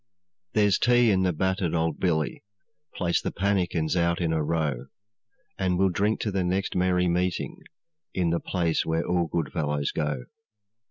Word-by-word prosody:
'There's 105 -2 +3
tea 120 -2 +4
in 95 -1 +2
the 90 -1 +2
battered 95 0 0
old 80 -2 0
billy; 80 -5 0 0.5
Place 85 -2 0
the - - -2
pannikins 90 -4 0
out 85 -1 +1
in 85 -2 0
a 80 -1 +1
row, 75 -5 -1 0.7
And 90 -1 +1
we'll 95 +1 +3
drink 100 +5 0
to 105 - -1
the 95 -1 0
next 95 +2 -1
merry 90 0 +2
meeting, 90 +1 -1 0.5
In 85 -2 0
the 85 - +1
place 85 -3 0
where 80 +1 -1
all 90 -1 +1
good 80 -3 -2
fellows 75 -2 -1
go. 75 -4 -2
90 Hz, 165 wpm, -26 LUFS, 80-95 Hz, 0.7 s, tea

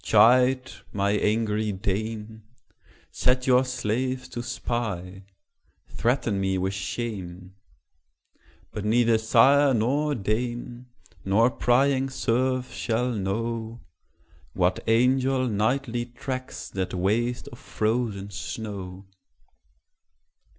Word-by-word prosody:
chide, 125 +4 +4 0.2
my 100 0 0
angry 105 0 +1
dame! 110 +3 -4 0.7
Set 125 0 +1
your 125 0 +5
slaves 125 +1 -2
to 120 - -5
spy; 110 -6 -4 0.7
threaten 115 -4 0
me 95 -1 0
with 95 +1 -1
shame: 95 -2 -5 1.2
But 105 - -5
neither 115 +1 +3
sire 135 +5 +5
nor 140 +7 +1
dame, 120 +3 -3 0.4
nor 110 +6 +3
prying 135 +2 +2
serf 130 0 0
shall 120 +2 -1
know, 115 +2 -3 0.7
What 90 0 +1
angel 130 +3 +3
nightly 120 +2 0
tracks 130 +1 -6
that 95 -1 -3
waste 115 +7 0
of 120 - -13
frozen 110 -3 -2
snow. 100 -2 -6
115 Hz, 95 wpm, -26 LUFS, 100-125 Hz, 1.2 s, your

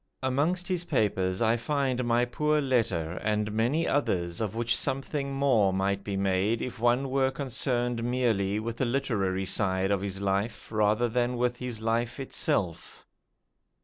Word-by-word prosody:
Amongst 155 +8 0
his 180 -2 0
papers 95 - 0
I 115 +1 +3
find 130 0 0
my 120 0 +2
poor 150 +5 +1
letter, 100 - 0
and 105 0 0
many 120 +10 +1
others 85 -11 0
of 110 -1 -2
which 115 0 +1
something 140 +1 -2
more 130 -8 +3
might 100 +1 0
be 100 -1 -3
made 100 +3 +1
if 125 -2 -6
one 120 +3 +2
were 135 0 +2
concerned 120 -3 -1
merely 115 -5 +1
with 115 +1 -4
the 130 - +1
literary 100 -7 0
side 95 0 0
of 100 -2 +1
his 100 -1 -4
life 100 +4 -2
rather 110 +2 +2
than 120 +1 0
with 125 0 0
his 125 -3 -5
life 115 +3 -1
itself. 100 -9 -2
115 Hz, 155 wpm, -28 LUFS, 100-130 Hz, -, I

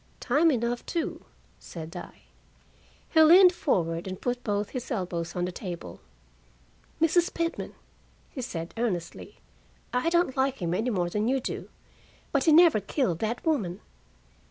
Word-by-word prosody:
"Time 295 +7 +3
enough, 240 -3 -1
too," 335 -3 -3 0.3
said 165 +1 -9
I. 175 - -9 0.9
He 320 - +5
leaned 355 +3 +8
forward 170 - -1
and 185 -1 -5
put 245 0 -2
both 205 -1 -1
his 255 -2 -6
elbows 175 - -3
on 175 0 0
the 180 - -3
table. 175 - -7 1.0
"Mrs. 335 +2 +3
Pitman," 335 0 -3 0.6
he 260 - -6
said 165 -8 -5
earnestly, 185 -8 -3 0.6
"I 250 +7 +1
don't 340 -5 +2
like 270 0 +1
him 170 -2 -1
any 220 +7 0
more 175 -6 -1
than 210 +3 0
you 265 +2 +2
do. - - -5 0.6
But 280 -2 +1
he 320 - +5
never 325 -6 +7
killed 200 - -1
that 230 +6 -3
woman." 210 - 0
235 Hz, 150 wpm, -27 LUFS, 180-300 Hz, 1.0 s, leaned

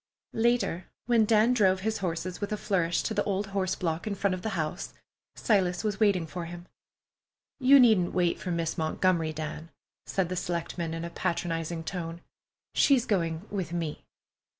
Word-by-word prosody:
Later, 225 -6 +1 0.2
when 235 -2 +4
Dan 220 +3 +4
drove 190 -5 +3
his 220 +2 -1
horses 180 0 -3
with 205 - -3
a 210 - 0
flourish 175 -5 0
to 220 - -2
the - - +1
old 200 0 0
horse 190 -2 0
block 165 +3 -2
in 205 - -1
front 200 -1 +1
of 185 - -4
the 215 -1 -3
house, 160 +3 -3 0.4
Silas 185 -4 +1
was 210 -2 -1
waiting 200 -6 +3
for 170 +2 -6
him. 175 +1 -8 0.9
"You 270 +1 +7
needn't 220 -8 +5
wait 175 -2 +2
for 185 - -5
Miss 165 -2 -1
Montgomery, 160 0 +1
Dan," 155 +1 -6 0.4
said 190 -3 0
the 185 - -2
selectman 170 -1 -3
in 165 0 -4
a 170 - -6
patronizing 165 -1 -2
tone. 170 -1 -5 0.5
"She's 265 -4 +4
going 170 -6 -1
with 190 -4 -3
me." 165 -3 -3
180 Hz, 175 wpm, -28 LUFS, 165-205 Hz, 0.9 s, You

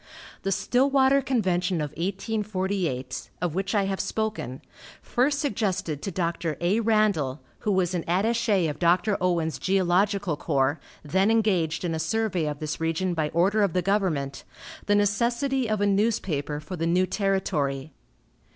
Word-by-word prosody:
The 195 - -1
Stillwater 270 +5 +3
convention 185 -9 0
of 150 -2 -3
1848, 190 - -2
of 175 -3 -1
which 195 +4 -2
I 200 - +3
have 195 0 -2
spoken, 215 - -3 0.4
first 275 +4 +1
suggested 195 - -1
to - - -3
Dr. 170 -4 -2
A. 180 +6 +2
Randall, 210 - +1 0.2
who 210 - -1
was 185 -2 +1
an 175 -2 -1
attache 205 -1 +2
of 150 -1 -4
Dr. 180 +4 +3
Owen's 170 -3 0
geological 190 -1 +1
corps, 140 -1 0 0.2
then 190 +7 +2
engaged 185 -8 +1
in 170 - -1
a 160 - -2
survey 180 -1 0
of 150 -1 -3
this 155 +1 -4
region 165 +3 0
by 155 -2 -1
order 190 +7 +2
of 200 -5 +2
the 180 - +1
government, 170 -9 0 0.4
the 205 - +4
necessity 235 +5 +1
of 215 -1 0
a - - +3
newspaper 195 -8 0
for 155 +5 -7
the 165 -1 -1
new 180 +2 +3
territory. 155 -9 -1
185 Hz, 150 wpm, -26 LUFS, 160-210 Hz, 0.4 s, the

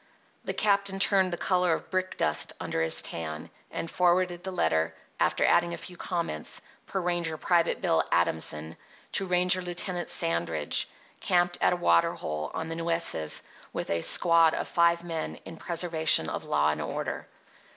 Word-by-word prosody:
The - - -3
captain 200 -2 +1
turned 195 -1 +2
the 175 - -2
colour 180 -2 +2
of - - -5
brick 185 0 -2
dust 75 - +2
under 80 - -2
his 80 0 -1
tan, 80 -2 -4 0.2
and - - -4
forwarded 175 +1 +1
the 190 - -4
letter, 80 - 0 0.2
after - - +2
adding 170 0 +3
a - - -10
few 180 - -8
comments, 170 - -3 0.3
per 195 - -2
ranger 175 -3 -1
Private 170 +1 +1
Bill 80 0 +3
Adamson, 80 -2 -1 0.3
to 195 - -1
ranger 180 0 +3
Lieutenant 175 0 -4
Sandridge, 85 -2 0 0.3
camped 175 0 +1
at - - +4
a - - +1
water 85 - +3
hole 75 0 -4
on 160 0 -3
the 165 - -4
Nueces 165 - -1 0.3
with - - -4
a 85 0 0
squad 165 - +5
of - - -3
five 170 0 +2
men 165 -2 -4
in 165 - -8
preservation 165 - +2
of - - -5
law 75 +1 +2
and 75 - -4
order. - - -4
170 Hz, 165 wpm, -28 LUFS, -, 0.3 s, squad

